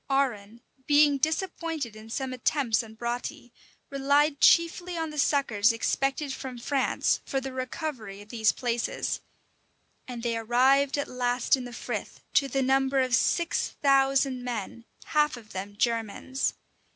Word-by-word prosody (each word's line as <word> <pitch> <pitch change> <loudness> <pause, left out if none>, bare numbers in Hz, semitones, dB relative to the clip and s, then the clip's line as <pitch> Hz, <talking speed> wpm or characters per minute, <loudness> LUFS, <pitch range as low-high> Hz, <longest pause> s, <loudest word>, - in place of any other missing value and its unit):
Arran, 235 -5 -1 0.3
being 290 -1 +5
disappointed 315 - -2
in 215 +1 -12
some 260 +2 -3
attempts 255 -2 +1
on 220 -1 -12
Broughty, 240 +1 -5 0.4
relied 280 +2 +2
chiefly 345 +1 +4
on 320 -1 -2
the 300 - -5
succors 240 -7 +3
expected 270 +4 -1
from 260 -2 -7
France 270 +3 0
for 270 - -2
the 265 0 -6
recovery 255 -6 -5
of 205 +1 -13
these 220 -2 +2
places; 240 -2 -2 0.9
and 240 -2 -7
they 235 -1 0
arrived 260 +5 +3
at 285 - -2
last 245 0 +1
in 255 -2 -6
the 245 - -8
frith, - - -5
to 275 - +4
the 270 +1 0
number 270 +1 +2
of 255 -1 0
six 340 +7 +1
thousand 270 -2 +3
men; 235 -1 -5 0.2
half 300 -3 +1
of 220 -3 -14
them 195 +2 -6
Germans. 230 +3 -1
260 Hz, 145 wpm, -27 LUFS, 235-280 Hz, 0.9 s, being